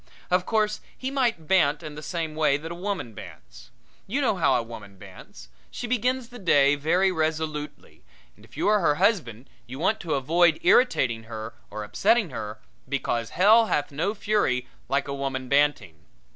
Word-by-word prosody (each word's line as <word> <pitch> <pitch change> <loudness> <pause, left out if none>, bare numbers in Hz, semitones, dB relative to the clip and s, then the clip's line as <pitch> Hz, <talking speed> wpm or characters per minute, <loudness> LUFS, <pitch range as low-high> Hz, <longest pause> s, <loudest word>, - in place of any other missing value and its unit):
Of 180 0 +2
course 215 -1 0 0.2
he 265 +1 -4
might 235 - 0
bant 155 -4 +2
in 155 -1 -7
the 150 - -8
same 165 -1 -4
way 155 -3 +2
that 160 +3 -8
a - - -3
woman 180 - -4
bants. - - -13 0.4
You 245 +9 -1
know 255 -7 +1
how 160 -7 +2
a 120 - +1
woman 105 -4 -11
bants. 60 -8 -13 0.2
She - - -6
begins 250 +1 -1
the 245 0 -11
day 145 -7 +4
very 170 +7 +2
resolutely, 155 -2 -4 0.3
and - - -21
if - - -17
you - - 0
are 210 0 +4
her 150 -5 +2
husband 150 - 0 0.2
you 130 +2 -8
want 190 +8 +1
to 165 -5 -2
avoid 165 +4 +3
irritating 135 - +3
her 110 0 -7 0.2
or 105 0 -6
upsetting 210 - +1
her, 110 -2 -6 0.3
because 120 -4 -2
hell 220 +5 +6
hath 145 - -1
no 165 +9 -2
fury 205 -12 0 0.2
like 140 +1 0
a 140 - -3
woman 135 -2 -3
banting. 140 - +1
155 Hz, 180 wpm, -25 LUFS, 130-200 Hz, 0.4 s, hell